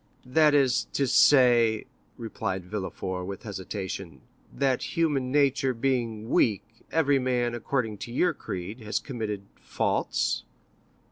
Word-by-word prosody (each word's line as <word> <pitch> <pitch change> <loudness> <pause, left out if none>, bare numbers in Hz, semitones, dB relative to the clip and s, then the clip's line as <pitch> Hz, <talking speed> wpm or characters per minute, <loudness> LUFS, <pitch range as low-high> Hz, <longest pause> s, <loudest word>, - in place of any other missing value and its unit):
"That 150 +3 +4
is 135 -4 +3
to 140 - +1
say," 120 -4 +5 0.3
replied 110 -5 -4
Villefort 95 -2 -4
with 100 -1 -7
hesitation, 95 -3 -6 0.3
"that 135 +1 -1
human 145 -6 +1
nature 140 -2 +2
being 115 -3 -1
weak, 105 -5 +3 0.3
every 145 -4 +3
man, 125 -2 0
according 115 -3 -2
to 120 - -7
your 180 +9 +2
creed, 95 +6 -6
has 110 -2 -2
committed 110 -7 -4 0.2
faults." - - -1
120 Hz, 120 wpm, -27 LUFS, 105-135 Hz, 0.3 s, say